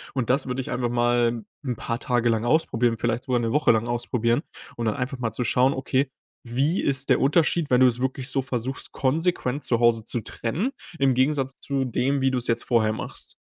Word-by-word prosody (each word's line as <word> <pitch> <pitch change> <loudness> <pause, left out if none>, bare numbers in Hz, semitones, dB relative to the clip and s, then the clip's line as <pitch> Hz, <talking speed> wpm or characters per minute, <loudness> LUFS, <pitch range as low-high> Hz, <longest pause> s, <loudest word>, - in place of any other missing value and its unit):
Und 130 -4 -1
das 135 +1 +1
würde 125 +1 -2
ich - - -7
einfach 125 -1 -1
mal 120 -1 +1 0.2
'n 125 -2 -1
paar 115 0 -4
Tage 120 -2 +1
lang 115 0 0
ausprobieren, 120 -5 +2
vielleicht 120 +2 -1
sogar 125 -2 +1
'ne 115 -1 -1
Woche 150 +4 +4
lang 115 0 +1
ausprobieren 120 +1 0 0.4
und 120 - -2
dann 110 - 0
einfach 130 +1 -4
mal 115 -2 -1
zu 125 - -2
schauen, 125 +3 +3
okay, 130 0 0 0.4
wie 135 +9 0
ist 140 0 0
der - - +4
Unterschied, 155 +2 +2
wenn 125 0 +4
du 130 - +8
es 120 -1 0
wirklich 130 0 -2
so 135 +1 0
versuchst, 130 0 -4
konsequent 145 -1 0
zu 120 - +1
Hause 120 -2 +3
zu 115 +1 -2
trennen, 150 - -2 0.3
im 135 -2 +3
Gegensatz 135 0 0
zu 135 -1 -2
dem, 130 +3 0
wie 135 - +3
du 130 - 0
es 125 - -1
jetzt 115 0 +1
vorher 110 -3 +2
machst? - - -7
125 Hz, 220 wpm, -24 LUFS, 120-135 Hz, 0.4 s, du